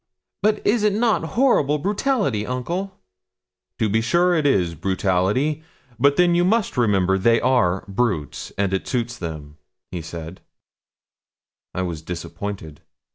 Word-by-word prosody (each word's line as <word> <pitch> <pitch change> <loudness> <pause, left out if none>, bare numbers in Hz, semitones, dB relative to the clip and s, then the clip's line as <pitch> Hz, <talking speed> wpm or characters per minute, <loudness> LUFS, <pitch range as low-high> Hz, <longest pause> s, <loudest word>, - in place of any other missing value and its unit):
'But 210 0 +1
is 220 +2 +3
it 210 -1 +2
not 220 -3 +1
horrible 150 - +3
brutality, 200 - 0
uncle?' 170 - -4 0.8
'To 110 - +1
be 110 +2 +2
sure 175 +9 +3
it 155 -4 +2
is 90 -10 +2
brutality; 95 - 0 0.4
but 140 +3 +4
then 175 +1 +4
you 175 0 +3
must 215 +3 +1
remember 95 -6 +2
they 115 +4 +4
are 115 -8 +2
brutes, 100 - -2
and 100 -1 0
it 95 - -2
suits 120 -1 -2
them,' 75 -3 -7 0.4
said 80 +2 -8 1.4
he. - - -2
I - - -1
was 85 -4 -4
disappointed. 85 -1 -6
115 Hz, 135 wpm, -22 LUFS, -, 1.4 s, but